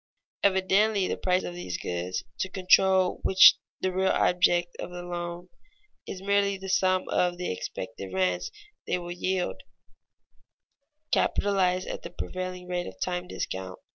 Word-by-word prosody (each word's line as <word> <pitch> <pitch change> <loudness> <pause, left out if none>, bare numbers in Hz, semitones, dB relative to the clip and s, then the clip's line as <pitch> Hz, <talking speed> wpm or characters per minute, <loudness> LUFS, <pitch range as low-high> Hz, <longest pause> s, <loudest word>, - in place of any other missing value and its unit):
Evidently 195 +1 +3
the - - -1
price 185 0 +1
of 175 - -5
these 175 - -5
goods, 90 +1 -3 0.2
to 190 - -1
control 190 0 +3
which 190 - +8
is - - -27 0.2
the 185 - 0
real 190 +1 +1
object 175 -1 +2
of - - -5
the 180 0 -7
loan, 175 0 -5 0.6
is 190 - -7
merely 200 0 +2
the 190 0 -8
sum 185 0 +2
of 175 -1 +1
the 180 - -3
expected 95 +1 -6
rents 90 -1 0 0.4
they - - +1
will 175 -1 -7
yield, 180 +1 -2 1.5
capitalized 185 -2 +1
at - - -5
the - - -7
prevailing 185 -1 -6
rate 180 -1 -2
of 95 0 -10
time 180 - -2
discount. 95 - -5
180 Hz, 150 wpm, -27 LUFS, 175-190 Hz, 1.5 s, which